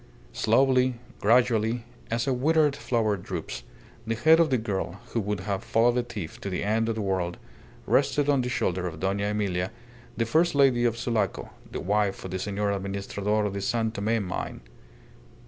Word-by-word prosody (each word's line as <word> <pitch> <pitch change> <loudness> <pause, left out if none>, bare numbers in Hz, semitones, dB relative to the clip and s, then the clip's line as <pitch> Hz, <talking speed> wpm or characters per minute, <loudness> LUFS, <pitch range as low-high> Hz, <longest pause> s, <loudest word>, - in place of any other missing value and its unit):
Slowly, 130 +2 +3 0.2
gradually, 115 0 +3 0.3
as 115 0 0
a 135 - +1
withered 150 +2 +3
flower 110 -6 0
droops, - - -5 0.5
the 115 - 0
head 160 +8 +5
of 165 -2 +4
the 130 - +3
girl, 100 -4 -3
who 115 - -1
would 105 -2 -2
have 100 0 -3
followed 120 +2 +3
a 125 - +2
thief 105 -9 -7
to 100 - -4
the 90 - -2
end 110 +2 +1
of 115 - -1
the 110 - -2
world, 90 -3 -1 0.5
rested 140 +1 +2
on 140 -2 +3
the 125 - -2
shoulder 90 -6 -1
of 80 -3 -7
Dona 100 +2 0
Emilia, 95 -3 -1 0.5
the 115 - +1
first 160 +7 +2
lady 130 -4 +4
of 115 -1 +1
Sulaco, 115 -2 -1 0.2
the - - -4
wife 100 +1 0
of 95 - -6
the 95 - -2
Senor 100 +1 -1
Administrador 100 +2 -1
of 100 - -2
the 100 - -3
San 110 +2 0
Tome 110 0 0
mine. 90 - -4
110 Hz, 180 wpm, -27 LUFS, 100-120 Hz, 0.5 s, head